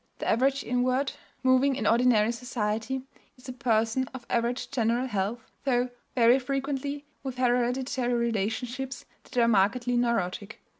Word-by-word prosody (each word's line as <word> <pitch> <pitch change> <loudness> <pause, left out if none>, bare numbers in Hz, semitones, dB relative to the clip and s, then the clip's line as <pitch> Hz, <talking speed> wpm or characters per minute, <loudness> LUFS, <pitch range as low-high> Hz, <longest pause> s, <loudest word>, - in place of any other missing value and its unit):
The - - -4
average 270 +3 +2
invert, 255 +3 0 0.3
moving 260 +1 +4
in 260 - -3
ordinary 230 -2 +4
society, 235 +1 -2 0.3
is 250 - -15
a 255 - -5
person 235 +1 +1
of 245 -2 -8
average 240 +1 -1
general 240 -1 +1
health, 215 0 -3
though 250 -2 +1 0.2
very 240 +1 +5
frequently 275 +2 -3 0.2
with 265 -2 -5
hereditary 250 0 +1
relationships 235 +3 -2 0.2
that - - -10
are 235 -1 +5
markedly 235 +4 +2
neurotic. 220 -4 -1
245 Hz, 135 wpm, -28 LUFS, 230-260 Hz, 0.3 s, very